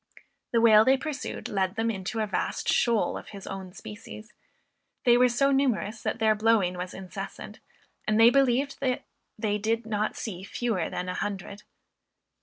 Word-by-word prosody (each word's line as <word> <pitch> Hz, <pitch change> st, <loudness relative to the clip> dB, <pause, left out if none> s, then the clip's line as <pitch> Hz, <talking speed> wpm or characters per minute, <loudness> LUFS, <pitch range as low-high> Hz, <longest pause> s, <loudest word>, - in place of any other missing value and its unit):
The 235 Hz, -, +3 dB
whale 220 Hz, -2 st, +7 dB
they 265 Hz, +3 st, +4 dB
pursued 295 Hz, 0 st, -5 dB
led 190 Hz, -2 st, -1 dB
them 225 Hz, 0 st, 0 dB
into 200 Hz, +2 st, -3 dB
a -, -, +1 dB
vast 210 Hz, -, -2 dB
shoal 235 Hz, -3 st, +2 dB
of -, -, -14 dB
his 200 Hz, -2 st, -9 dB
own 190 Hz, -2 st, -6 dB
species; 215 Hz, +2 st, -10 dB, 0.7 s
they 240 Hz, -2 st, +6 dB
were 250 Hz, +1 st, +5 dB
so 275 Hz, +4 st, +2 dB
numerous 245 Hz, -5 st, 0 dB
that -, -, -2 dB
their 220 Hz, -1 st, +3 dB
blowing 215 Hz, -4 st, +2 dB
was 180 Hz, +1 st, -6 dB
incessant, 190 Hz, -1 st, -8 dB, 0.5 s
and 215 Hz, +1 st, +2 dB
they 230 Hz, +1 st, +8 dB
believed 275 Hz, +1 st, +2 dB
that 255 Hz, -2 st, -1 dB, 0.3 s
they 210 Hz, -1 st, -1 dB
did 225 Hz, +2 st, -1 dB
not 215 Hz, -1 st, -1 dB
see 190 Hz, -6 st, -5 dB
fewer 205 Hz, -3 st, -2 dB
than 180 Hz, -, -4 dB
an 180 Hz, -, -3 dB
hundred. 200 Hz, 0 st, -4 dB
220 Hz, 170 wpm, -27 LUFS, 200-240 Hz, 0.7 s, they